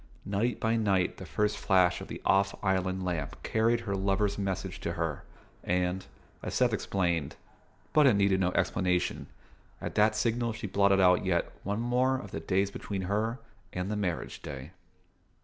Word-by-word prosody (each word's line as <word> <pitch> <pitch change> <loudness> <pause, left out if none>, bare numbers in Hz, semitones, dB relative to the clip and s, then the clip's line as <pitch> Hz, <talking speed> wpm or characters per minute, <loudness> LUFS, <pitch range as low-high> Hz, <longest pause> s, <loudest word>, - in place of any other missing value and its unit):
Night 105 +5 0
by 115 +1 +1
night 95 -5 +1
the - - -8
first 105 0 0
flash 90 -2 +3
of - - -7
the - - -7
Off 100 0 +3
Island 95 -1 0
lamp 85 -5 -3
carried 115 +1 +2
her 105 -4 -3
lover's 100 +1 +1
message 95 -2 -3
to - - -3
her, 80 -4 -3 0.4
and, 90 +1 0 0.3
as - - -4
Seth - - +3
explained 85 -6 -1 0.6
(but 150 -2 +6
it 125 - +5
needed 100 -1 +3
no 90 -1 +2
explanation), 90 -1 0 0.5
at - - -5
that 105 +1 +4
signal 115 +1 0
she 110 0 -6
blotted 100 0 +3
out 90 -1 +5
yet 85 -2 0
one 100 +3 -2
more 125 +2 +2
of 100 -6 -8
the - - -4
days 95 +4 0
between 100 -1 -4
her 105 +5 0 0.4
and 90 +3 -2
the - - -1
marriage 95 -5 -3
day. 70 +3 -7
100 Hz, 170 wpm, -30 LUFS, 90-105 Hz, 0.6 s, but